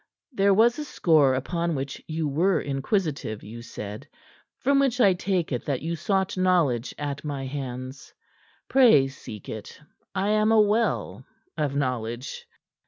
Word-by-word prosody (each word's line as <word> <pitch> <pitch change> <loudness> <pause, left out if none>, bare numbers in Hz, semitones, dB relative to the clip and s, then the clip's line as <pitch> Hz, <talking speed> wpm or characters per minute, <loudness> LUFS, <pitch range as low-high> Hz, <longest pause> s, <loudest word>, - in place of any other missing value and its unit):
There 200 -5 +3
was 230 +7 +4
a - - -2
score 155 - +3
upon 170 +5 -1
which 135 0 -5
you 160 -1 -2
were 170 +6 +2
inquisitive, 140 - -2
you 115 +3 -9
said; 105 -2 -8 0.5
from 275 +1 +2
which 265 -3 +1
I 200 -6 +6
take 180 -2 -1
it 125 - -2
that 140 -2 -2
you 165 +1 -2
sought 190 +3 0
knowledge 170 -10 +1
at 145 -1 -4
my 140 -3 -4
hands. 130 -1 -6 0.6
Pray 230 - +6
seek 110 -6 -10
it; 110 -2 -8 0.4
I 195 +2 0
am 215 +1 +3
a 225 - +5
well, 215 +2 +1 0.3
of 145 -2 -1
knowledge." 125 -2 -3
150 Hz, 150 wpm, -25 LUFS, 135-195 Hz, 0.6 s, I